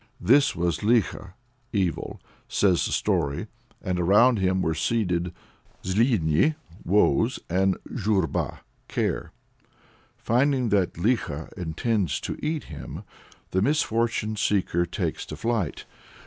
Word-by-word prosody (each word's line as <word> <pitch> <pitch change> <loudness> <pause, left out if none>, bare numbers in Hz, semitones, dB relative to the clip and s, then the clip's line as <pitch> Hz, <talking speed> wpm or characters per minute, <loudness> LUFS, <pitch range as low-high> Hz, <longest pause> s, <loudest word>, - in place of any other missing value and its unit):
"This 140 +4 +4
was 85 -2 0
Likho 105 -4 +1 0.4
(Evil)," 95 -5 -2 0.3
says 95 -4 +2
the - - -5
story, 70 0 0 0.4
"and 90 -1 -1
around 105 +7 +5
him 95 0 +1
were 80 - +1
seated 90 -1 0 0.5
Zluidni 100 - +2 0.3
(Woes) 105 +5 +3
and 95 +1 +2 0.2
Zhurba 100 -7 -1 0.3
(Care)." - - -2 0.9
Finding 130 0 +1
that 100 -4 +2
Likho 85 - -1
intends 90 - -1
to - - -4
eat 155 0 -1
him, - - -8 0.5
the 95 - +1
misfortune 115 -5 +1
seeker 90 -4 +1
takes - - -3
to - - -6
flight. 115 -9 -2
100 Hz, 110 wpm, -25 LUFS, 90-115 Hz, 0.9 s, around